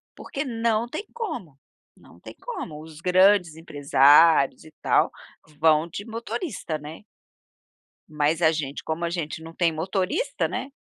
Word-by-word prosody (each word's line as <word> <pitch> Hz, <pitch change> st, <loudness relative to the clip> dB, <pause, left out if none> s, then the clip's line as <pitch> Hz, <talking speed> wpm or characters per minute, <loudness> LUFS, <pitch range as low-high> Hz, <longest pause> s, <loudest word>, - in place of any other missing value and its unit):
porque 275 Hz, -, -5 dB
não 230 Hz, -1 st, 0 dB
tem 315 Hz, -, -6 dB
como. 195 Hz, -, -6 dB, 0.4 s
Não -, -, -19 dB
tem -, -, -12 dB
como. 355 Hz, -, -6 dB
Os 155 Hz, -1 st, -12 dB
grandes 185 Hz, -2 st, +4 dB
empresários 145 Hz, -1 st, +4 dB
e 155 Hz, -, -14 dB
tal -, -, +2 dB, 0.5 s
vão 160 Hz, 0 st, +4 dB
de 200 Hz, +5 st, -7 dB
motorista, 230 Hz, -, -5 dB
né. 155 Hz, +6 st, -10 dB, 1.1 s
Mas 150 Hz, +2 st, 0 dB
a 160 Hz, -1 st, +5 dB
gente 145 Hz, -3 st, -4 dB
como 160 Hz, +2 st, -3 dB
a -, -, -1 dB
gente 165 Hz, -2 st, -4 dB
não 165 Hz, +1 st, -10 dB
tem 170 Hz, -1 st, +1 dB
motorista, 190 Hz, -, -1 dB
né. 270 Hz, -, -5 dB
165 Hz, 145 wpm, -24 LUFS, 155-220 Hz, 1.1 s, a